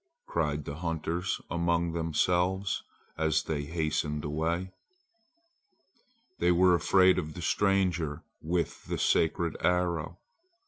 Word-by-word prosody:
cried 75 -3 -1
the 70 - -6
hunters 85 +1 -2
among 85 0 0
themselves 90 +4 0 0.4
as 80 -1 +2
they 75 -2 -3
hastened 75 -2 -2
away. 85 +5 -1 1.7
They 90 - +3
were 90 +1 +5
afraid 95 +2 +4
of 75 0 -6
the 90 - -6
stranger 90 -6 +1 0.2
with 85 +2 -2
the - - -3
sacred 85 0 +1
arrow. 85 -2 0
85 Hz, 105 wpm, -29 LUFS, 80-90 Hz, 1.7 s, were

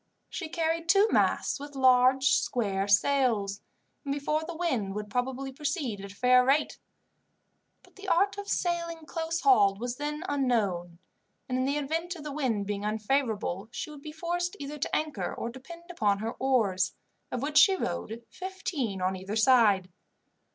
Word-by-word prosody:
She 325 -4 -5
carried 330 0 -1
two 400 +2 +6
masts - - +1
with 285 0 -9
large 260 0 +5
square 200 -5 0
sails, 205 -3 +2 0.4
and 280 - -3
before 295 +2 -1
the 335 +1 -6
wind 250 - -1
would 210 -1 -5
probably 265 +3 -2
proceed 280 - -3
at 200 0 -8
a - - -15
fair 250 +2 +5
rate; 280 +4 +1 1.0
but - - -22
the 395 +1 -10
art 395 +3 +3
of 405 - -7
sailing 335 -3 -2
close 330 +1 -3
hauled 200 - +4
was 245 +1 -4
then 300 +2 -4
unknown, 205 - 0 0.5
and 255 0 -1
in 255 - +1
the 280 +2 0
event 325 +5 -2
of 315 - -9
the 300 - -5
wind 250 -8 -1
being 205 0 -3
unfavourable 215 -3 -1
she 305 - -5
would 295 -2 -11
be 305 - -8
forced 350 +4 -2
either 290 +1 -6
to - - -1
anchor 305 -2 -2
or 235 - -4
to 250 +3 -10
depend 335 +6 -11
upon 210 - +1
her 220 +3 -3
oars, 205 -9 +1 0.4
of 250 +1 -3
which 295 +1 +4
she 390 -3 +6
rowed 230 - -4
fifteen 320 - -4
on 185 +1 0
either 190 +3 -5
side. 220 -5 +4
265 Hz, 170 wpm, -28 LUFS, 215-320 Hz, 1.0 s, two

